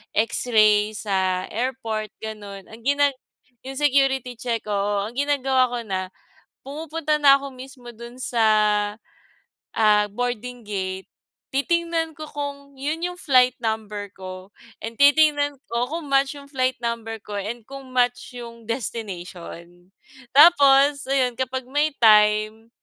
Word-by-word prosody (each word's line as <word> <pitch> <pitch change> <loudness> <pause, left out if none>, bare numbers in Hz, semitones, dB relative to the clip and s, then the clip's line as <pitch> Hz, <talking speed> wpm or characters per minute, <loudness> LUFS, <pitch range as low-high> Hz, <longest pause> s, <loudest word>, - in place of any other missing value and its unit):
X-ray 215 -2 +3
sa 190 -3 -1
airport 225 -3 -3
ganun, 205 -3 -8
ang 220 +1 -13
ginag 285 +1 +2 0.5
yung 270 +1 -6
security 270 -3 +2
check, 230 -1 -3
oo. 200 0 0
Ang 220 - -7
ginagawa 270 -3 +2
ko 245 0 -3
na, 185 -2 -3 0.5
pumupunta 305 +2 -2
na 280 -2 +7
ako 280 - -6
mismo 255 -1 -11
dun 235 +2 -11
sa, 240 -3 0 1.3
ah 210 -1 +4
boarding 245 +1 -4
gate. 190 -2 -4 0.5
Titingnan 335 +2 0
ko 310 - -6
kung 280 -1 -6
'yon 305 +5 -3
yung 360 - -7
flight 255 -6 +4
number 210 -2 -3
ko 185 +1 -9 0.3
and 230 +1 -5
titingnan 290 0 +4 0.2
ko 235 +1 0
kung 320 0 -5
match 275 +1 +2
yung 280 0 -13
flight 255 -2 0
number 230 -1 -3
ko 205 - -7
and 225 +4 -5
kung 275 -1 -9
match 245 0 0
yung 235 -1 -10
destination. 180 -6 -6 0.5
Tapos, 285 -2 +6
ayon 265 -2 +2
kapag 260 0 -2
may 295 +2 +1
time, 215 0 +4
245 Hz, 130 wpm, -23 LUFS, 215-280 Hz, 1.3 s, na